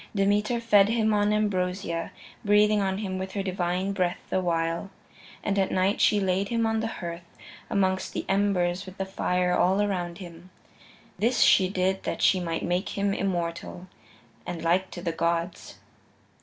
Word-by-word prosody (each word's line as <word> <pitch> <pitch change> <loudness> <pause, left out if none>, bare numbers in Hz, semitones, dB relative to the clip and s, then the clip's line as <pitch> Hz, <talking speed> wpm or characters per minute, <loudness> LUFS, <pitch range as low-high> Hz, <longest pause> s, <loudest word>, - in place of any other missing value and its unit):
Demeter 210 +4 +1
fed 210 -3 +4
him 220 -1 +2
on 205 0 +2
ambrosia, 185 -4 -1 0.3
breathing 210 0 +4
on 190 -1 -1
him 190 -3 -3
with 190 0 -5
her 200 - -2
divine 185 0 -1
breath 185 -3 0
the 185 - +1
while. 165 +1 -1 0.5
And 200 -1 0
at 190 - +1
night 190 +2 +1
she 210 - +4
laid 190 0 0
him 230 -1 +1
on 225 0 +1
the 225 - -1
hearth, 170 -4 -7 0.3
amongst 190 -1 0
the - - -3
embers, 190 -2 +1
with 185 - -10
the 195 - -2
fire 180 -1 0
all 190 +2 +3
around 180 -4 -1
him. 175 -1 -11 0.7
This 235 +3 +2
she 185 -1 +5
did 190 0 0
that - - -3
she 185 - +4
might 165 -2 -3
make 180 +3 -2
him 200 0 +1
immortal, 175 -2 -3 0.6
and 170 -2 -6
like 180 +3 +1
to 175 - -8
the 170 - -1
gods. 170 +1 -2
190 Hz, 170 wpm, -26 LUFS, 175-205 Hz, 0.7 s, she